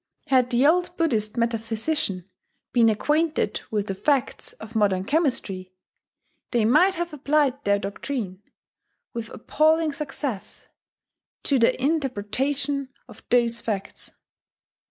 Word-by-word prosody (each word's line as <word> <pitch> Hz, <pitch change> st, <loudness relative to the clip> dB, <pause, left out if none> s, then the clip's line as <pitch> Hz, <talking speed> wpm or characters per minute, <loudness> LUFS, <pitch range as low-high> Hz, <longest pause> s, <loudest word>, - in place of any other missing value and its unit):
Had 255 Hz, -2 st, +3 dB
the 245 Hz, +2 st, +3 dB
old 355 Hz, +3 st, +2 dB
Buddhist 225 Hz, -10 st, 0 dB
metaphysicians 225 Hz, -, -1 dB, 0.5 s
been 230 Hz, -2 st, +5 dB
acquainted 300 Hz, +9 st, 0 dB
with 210 Hz, -2 st, -1 dB
the 195 Hz, -, -3 dB
facts 270 Hz, +6 st, 0 dB
of 220 Hz, +1 st, -11 dB
modern 200 Hz, -4 st, +2 dB
chemistry, 200 Hz, -, -1 dB, 0.7 s
they 235 Hz, -3 st, +2 dB
might 350 Hz, -, +4 dB
have 345 Hz, -1 st, -3 dB
applied 285 Hz, -1 st, +1 dB
their 200 Hz, 0 st, +3 dB
doctrine, 200 Hz, 0 st, -5 dB, 0.7 s
with 230 Hz, -1 st, -5 dB
appalling 315 Hz, +4 st, +2 dB
success, 280 Hz, -7 st, -5 dB, 0.8 s
to 275 Hz, -3 st, +2 dB
the 230 Hz, -, +3 dB
interpretation 275 Hz, 0 st, -1 dB, 0.2 s
of 225 Hz, -3 st, -14 dB
those 235 Hz, -1 st, +3 dB
facts. 200 Hz, -3 st, -4 dB
250 Hz, 115 wpm, -24 LUFS, 215-295 Hz, 0.8 s, been